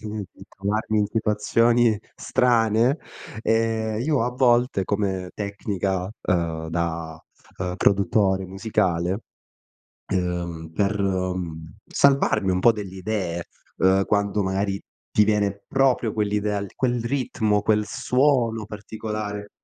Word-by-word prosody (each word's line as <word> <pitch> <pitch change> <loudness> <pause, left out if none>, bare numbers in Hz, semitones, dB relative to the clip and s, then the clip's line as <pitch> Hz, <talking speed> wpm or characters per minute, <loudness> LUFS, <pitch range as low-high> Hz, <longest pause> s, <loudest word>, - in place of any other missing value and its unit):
di 105 -2 -5
di 95 - -13
trovarmi 105 +2 -1
in 105 - +2
situazioni 115 +2 +2 0.2
strane, 120 +2 +2 0.4
ehm, 110 -1 +1
io 140 -1 +1
a 125 - 0
volte 125 -5 +2
come 95 -2 -1
tecnica, 100 -2 -2
uhm, 80 -2 -1
da, 80 -1 -3 0.4
uhm, 90 -1 -3
produttore 95 0 +2
musicale, 95 -2 0 0.9
uhm, 85 -3 -2
per, 100 +2 0
mhmm, 90 -4 -2
salvarmi 135 -8 +3
un 90 - +1
po' 115 - +6
delle 100 -4 -7
idee, 90 -3 -3 0.3
uhm, 95 +1 +3
quando 100 0 +1
magari 95 +1 -1 0.3
ti 105 - +5
viene 100 -2 0
proprio 130 -5 +2
quell'idea 105 -1 0
al 100 -1 -5
quel 120 -2 0
ritmo, 115 -5 0
quel 105 0 +2
suono 120 -1 +1
particolare 105 -1 -5
105 Hz, 115 wpm, -24 LUFS, 95-110 Hz, 0.9 s, po